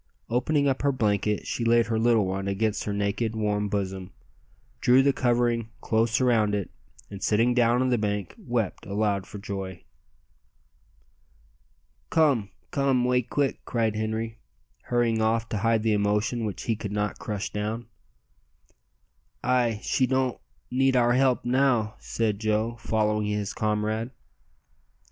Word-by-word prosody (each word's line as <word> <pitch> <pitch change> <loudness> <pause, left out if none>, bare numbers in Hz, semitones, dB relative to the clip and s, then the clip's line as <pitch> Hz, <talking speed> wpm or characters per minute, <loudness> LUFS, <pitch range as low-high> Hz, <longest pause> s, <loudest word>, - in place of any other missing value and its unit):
Opening 140 +4 +2
up 135 -1 0
her 140 - +2
blanket 105 -4 0
she 120 - -3
laid 115 0 +4
her 110 0 -1
little 115 -2 +3
one 95 +1 -3
against 105 +2 -1
her 105 - -2
naked, 100 +2 -1
warm 105 -1 0
bosom, 95 -2 -3 0.7
drew 130 +2 +5
the 140 0 +3
covering 120 -2 +1
close 110 0 +1
around 115 -5 +3
it, 100 -2 -3 0.4
and 100 -1 -8
sitting 115 +3 +2
down 120 0 +3
on 130 - +1
the 120 -2 +2
bank 105 -3 -2
wept 115 -6 -3
aloud 100 -1 0
for 105 - -8
joy. 95 -2 -6 2.3
"Come 140 -11 +2 0.2
come 135 -3 +2
'way 125 0 +3
quick," 135 +3 -1
cried 110 -3 0
Henri, 110 +1 -3 0.5
hurrying 120 -2 +1
off 115 +1 +1
to 105 - -2
hide 115 +1 +2
the 110 -1 +2
emotion 105 +3 0
which 105 - -4
he 115 - 0
could 105 -1 -6
not 105 0 -2
crush 105 -3 -4
down. 110 +3 -3 1.6
"Ay, 120 -4 +1
she 130 - +1
don't 130 -1 0 0.3
need 135 +1 +2
our 120 -1 +4
help 130 -1 +2
now," 120 -4 +2
said 110 -3 -1
Joe, 110 +2 0
following 105 -1 0
his 105 -1 -2
comrade. 110 +2 -1
110 Hz, 145 wpm, -26 LUFS, 105-120 Hz, 2.3 s, drew